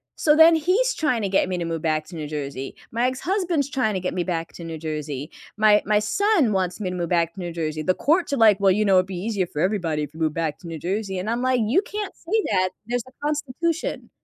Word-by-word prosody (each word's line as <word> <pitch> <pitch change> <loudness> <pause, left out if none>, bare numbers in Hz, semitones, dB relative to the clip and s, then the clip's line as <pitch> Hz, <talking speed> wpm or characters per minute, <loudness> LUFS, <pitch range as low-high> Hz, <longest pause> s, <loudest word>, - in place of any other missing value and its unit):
so 300 -1 +3
then 325 +1 +8
he's 395 +11 +2
trying 275 -8 0
to 200 - -1
get 190 - +2
me 185 -1 -2
to 170 - -2
move 165 -1 -3
back 155 -1 0
to 175 - -10
New 155 -2 -5
Jersey, 140 -3 -5 0.2
my 235 +2 0
ex-husband's 330 +1 -1
trying 255 -6 0
to 190 - -1
get 180 - -2
me 180 - -1
back 165 -2 -3
to 170 - -9
New 165 -1 -6
Jersey, 150 -2 -5 0.3
my 210 -1 +5
my 210 0 +3
son 330 - +2
wants 185 0 -1
me 190 - -2
to 180 - -4
move 170 -2 -3
back 170 -1 +1
to - - -11
New 175 -2 -4
Jersey, 155 -2 -3
the 185 - +2
courts 315 - +1
are, - - +1
like, 215 -3 +5
"Well, 195 -1 +4
you 210 +3 +2
know, 195 -1 +4
it'd 185 0 +4
be 190 - -6
easier 195 0 -1
for 150 - -4
everybody 170 -6 0
if 145 +1 -7
you 160 - -11
move 155 -2 +1
back 160 -3 -2
to 170 - -11
New 165 -2 -6
Jersey," 190 +2 -2
and 205 +4 -3
I'm, 235 +1 -1
like, 255 -1 +2
"You 270 - +3
can't 420 -3 -5
say 425 +6 -1
that, 185 -1 +2 0.2
there's 245 0 -2
a - - -14
constitution." 300 +3 -2
195 Hz, 265 wpm, -23 LUFS, 165-260 Hz, 0.3 s, then